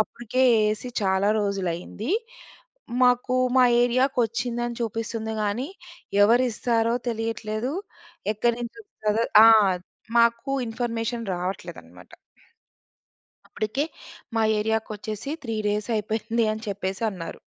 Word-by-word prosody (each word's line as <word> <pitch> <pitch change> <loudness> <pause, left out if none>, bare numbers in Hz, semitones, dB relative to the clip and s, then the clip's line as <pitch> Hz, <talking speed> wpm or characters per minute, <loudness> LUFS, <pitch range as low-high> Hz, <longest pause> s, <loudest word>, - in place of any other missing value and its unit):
అప్పటికే 240 +3 -1
యేసి 215 +2 0
చాలా 190 +1 +2
రోజులు 200 -3 -1
అయింది. 205 - -6 0.9
మాకు 250 0 +3 0.2
మా 255 - +7 0.2
ఏరియా‌కొచ్చిందని 240 -1 0
చూపిస్తుంది 225 0 -3
గాని 220 +7 -1 0.5
ఎవరిస్తారో 230 0 +2
తెలియట్లేదు. 225 +1 -2 0.6
ఎక్కడి 235 +3 +1
నుంచి 240 - -6
వస్తా‌దో 220 - -1 0.2
ఆ! - - +10 0.7
మాకు 235 +3 +3 0.2
ఇన్ఫర్మేషన్ 230 0 -3
రావట్లేదనమాట. 175 - -7 1.4
అప్పటికే 220 +7 -2 0.5
మా 225 - +2 0.2
ఏరియకొచ్చేసి 215 +2 -3
3 225 -2 -3
డేస్ 210 +2 -1
అయిపోయింది 220 +2 -1
అని 220 0 -6
చెప్పేసి 195 +1 -3
అన్నారు. 170 -3 -7
225 Hz, 95 wpm, -25 LUFS, 210-240 Hz, 1.4 s, ఆ